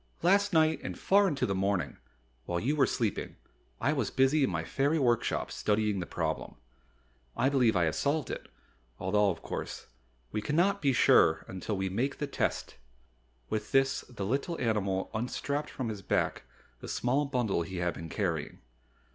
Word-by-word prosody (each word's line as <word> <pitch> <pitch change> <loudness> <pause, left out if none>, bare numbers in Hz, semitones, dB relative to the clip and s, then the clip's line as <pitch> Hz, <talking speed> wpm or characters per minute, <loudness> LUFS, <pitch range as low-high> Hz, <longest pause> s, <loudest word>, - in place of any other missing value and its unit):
"Last 200 +3 +4
night 160 -2 +3
and - - -5
far 200 +1 +4
into 145 -7 0
the 100 - -1
morning, 95 -1 -1 0.5
while 85 0 -1
you 140 - 0
were 135 -4 +4
sleeping, 110 -4 -2 0.4
I 140 +5 +2
was 130 -8 -1
busy 135 +3 +3
in - - +2
my 85 -3 -2
fairy 140 - +1
workshop, 120 -5 +1
studying 105 -1 0
the 90 - -4
problem. 80 -2 -3 0.8
I 130 - +3
believe 125 -6 +3
I 90 - +3
have 80 -2 +1
solved 145 +1 0
it, - - -6 0.5
although, 100 +2 +2
of 85 -3 -4
course, - - -5 0.5
we 105 - -2
cannot 170 - +1
be 140 - +3
quite 130 - +2
sure 80 0 +5
until 95 +2 -4
we 95 0 -1
make 120 +9 -1
the 145 - -2
test." 140 - -2 0.7
With 105 -1 -3
this 135 0 +3
the 110 -6 -5
little 140 - -1
animal 100 -5 0
unstrapped 140 +6 -2
from 130 -4 -4
his 105 -2 -5
back - - -1 0.3
the - - -9
small 135 +4 +1
bundle 120 -10 0
he 95 +2 -5
had 85 -1 0
been 80 0 -8
carrying. 85 -8 -2
115 Hz, 175 wpm, -30 LUFS, 95-140 Hz, 0.8 s, sure